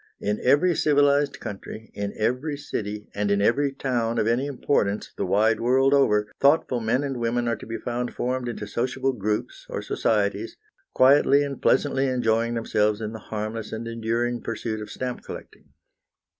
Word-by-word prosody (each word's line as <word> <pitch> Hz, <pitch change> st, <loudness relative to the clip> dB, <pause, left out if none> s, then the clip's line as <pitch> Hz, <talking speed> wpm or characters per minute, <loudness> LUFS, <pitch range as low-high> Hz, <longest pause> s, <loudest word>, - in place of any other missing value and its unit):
In 105 Hz, +1 st, -1 dB
every 145 Hz, +8 st, +4 dB
civilised 145 Hz, -1 st, +3 dB
country, 105 Hz, +2 st, -8 dB
in 100 Hz, 0 st, -3 dB
every 125 Hz, +7 st, -1 dB
city, 105 Hz, -7 st, -5 dB
and 105 Hz, 0 st, -1 dB
in 100 Hz, 0 st, +2 dB
every 135 Hz, +7 st, +2 dB
town 120 Hz, -4 st, -1 dB
of 105 Hz, -, +2 dB
any 120 Hz, +5 st, +1 dB
importance, 115 Hz, -7 st, -1 dB
the -, -, -2 dB
wide 110 Hz, +2 st, +3 dB
world 130 Hz, +3 st, +3 dB
over, 105 Hz, -7 st, +3 dB
thoughtful 140 Hz, -3 st, +3 dB
men 115 Hz, +4 st, 0 dB
and 135 Hz, -2 st, -3 dB
women 120 Hz, 0 st, 0 dB
are 115 Hz, -, +1 dB
to -, -, -11 dB
be 115 Hz, 0 st, -4 dB
found 120 Hz, +2 st, -4 dB
formed 125 Hz, 0 st, -2 dB
into 110 Hz, -3 st, -5 dB
sociable 130 Hz, +5 st, -1 dB
groups, 105 Hz, -2 st, -3 dB
or -, -, -4 dB
societies, 105 Hz, 0 st, 0 dB, 0.4 s
quietly 140 Hz, +2 st, +5 dB
and 140 Hz, -1 st, -5 dB
pleasantly 135 Hz, -1 st, +2 dB
enjoying 115 Hz, -2 st, +1 dB
themselves 105 Hz, -2 st, +1 dB
in 110 Hz, 0 st, -4 dB
the 110 Hz, -, -7 dB
harmless 110 Hz, +1 st, -5 dB
and 115 Hz, +1 st, -5 dB
enduring 115 Hz, +1 st, -1 dB
pursuit 110 Hz, -1 st, -4 dB
of 105 Hz, -, -7 dB
stamp 125 Hz, -1 st, -4 dB
collecting. -, -, -10 dB
115 Hz, 170 wpm, -25 LUFS, 110-135 Hz, 0.4 s, quietly